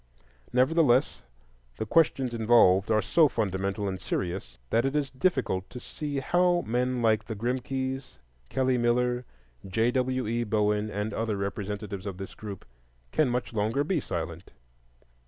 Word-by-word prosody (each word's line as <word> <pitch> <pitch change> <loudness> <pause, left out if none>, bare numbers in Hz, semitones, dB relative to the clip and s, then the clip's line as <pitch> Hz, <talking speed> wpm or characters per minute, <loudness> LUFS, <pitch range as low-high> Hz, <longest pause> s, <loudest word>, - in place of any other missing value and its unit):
Nevertheless, 130 0 +3 0.6
the - - -2
questions 135 -2 +2
involved 110 -4 +4
are 110 -1 +3
so 165 -2 +5
fundamental 100 -4 -1
and 95 -1 -4
serious 90 -9 -3
that 115 - +3
it 135 +2 -1
is 140 -3 0
difficult 130 - 0
to 125 - -8
see 145 +3 -5
how 175 +3 +2
men 125 +1 0
like 110 -1 +3
the 110 - -5
Grimkes, 130 +3 -3 0.3
Kelly 130 -1 +1
Miller, 125 +1 +1 0.4
J. 110 +5 +1
W. 130 0 0
E. 115 +2 0
Bowen, 105 -1 +1
and 105 +1 -3
other 110 -2 -1
representatives 100 0 -4
of 95 -2 -5
this 95 0 -7
group, 100 -3 -8 0.5
can 150 -4 +2
much 120 0 -2
longer 110 +6 +1
be 165 +2 0
silent. 85 - -5
115 Hz, 145 wpm, -28 LUFS, 105-130 Hz, 0.6 s, so